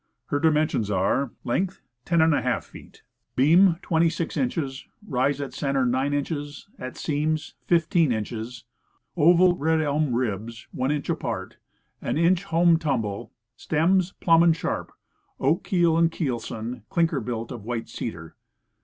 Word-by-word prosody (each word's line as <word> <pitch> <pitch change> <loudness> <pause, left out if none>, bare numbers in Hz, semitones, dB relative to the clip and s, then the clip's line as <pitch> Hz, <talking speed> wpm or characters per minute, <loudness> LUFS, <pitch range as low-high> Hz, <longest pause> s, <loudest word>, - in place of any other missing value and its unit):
Her 145 - 0
dimensions 150 -8 +2
are: 105 +7 +1
Length, 185 +10 -1 0.3
10^ 160 -7 +2
feet; - - -15 0.3
beam, 165 +7 +5
26 165 0 0
inches; 135 -1 -2 0.2
rise 135 +1 0
at 140 -1 -5
center, 135 -2 0
9 130 +3 +1
inches; 145 +1 -3
at 130 0 -7
stems, 155 +1 -1
15 165 -3 +3
inches; 115 +2 -4 0.5
oval 175 +3 +5
red 160 +1 +1
elm 150 -3 0
ribs, 115 0 -3
1 130 +1 -1
inch 150 -1 -1
apart; - - -3 0.4
an - - -2
inch 175 +3 +2
home 170 -2 +4
tumble; 115 - -2 0.2
stems, 175 +4 +1
plumb 165 -1 +4
and 170 -1 +5
sharp; - - -3 0.5
oak 150 +6 +1
keel 170 -3 +2
and 165 0 +3
keelson; 120 -6 -4
clinker 170 -4 +1
built, 115 -2 -4
of 120 -5 -7
white 115 0 -4
cedar. 80 -8 -7
145 Hz, 135 wpm, -25 LUFS, 125-165 Hz, 0.5 s, beam